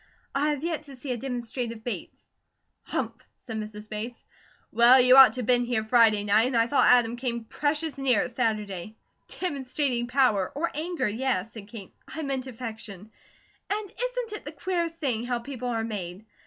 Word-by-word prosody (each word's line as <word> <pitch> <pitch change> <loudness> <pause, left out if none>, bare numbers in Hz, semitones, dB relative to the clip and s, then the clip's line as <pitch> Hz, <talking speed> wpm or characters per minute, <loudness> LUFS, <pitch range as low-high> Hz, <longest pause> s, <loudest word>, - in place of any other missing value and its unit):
I 285 +2 +1
have 295 -1 -2
yet 335 -2 -1
to 275 -2 -10
see 255 +1 -6
a 245 - -1
demonstrative 240 -2 -4
Bates." 245 - -6 0.6
"Humph!" - - -3 0.2
said 225 -2 -7
Mrs. 210 0 -8
Bates. 220 +3 -6 0.5
"Well, 240 +3 +7
you 255 0 +7
ought 270 -1 +9
to 255 - -3
been 245 +2 +3
here 240 -2 0
Friday 220 -2 +4
night, 210 +3 +4
and 255 -2 0
I 230 - +4
thought 280 +4 +3
Adam 240 -1 +5
came 235 -2 -2
precious 295 +5 -2
near 255 -5 +3
it 250 -2 -7
Saturday." 215 -4 -2 0.3
"Demonstrating 270 -6 -2
power, 245 -7 +2
or 330 +4 -1
anger, 330 +1 -2
yes," 225 -2 -1
said 210 -3 -10
Kate. 210 -4 -10
"I 315 - -6
meant 270 -2 -2
affection. 220 -4 -8 0.6
And 410 -1 -3
isn't - - -3
it - - -24
the 295 - -7
queerest 335 +2 -2
thing 260 -9 -1
how 245 0 -1
people 250 0 -6
are 230 -2 -1
made? 200 -3 -6
245 Hz, 180 wpm, -27 LUFS, 220-275 Hz, 0.6 s, ought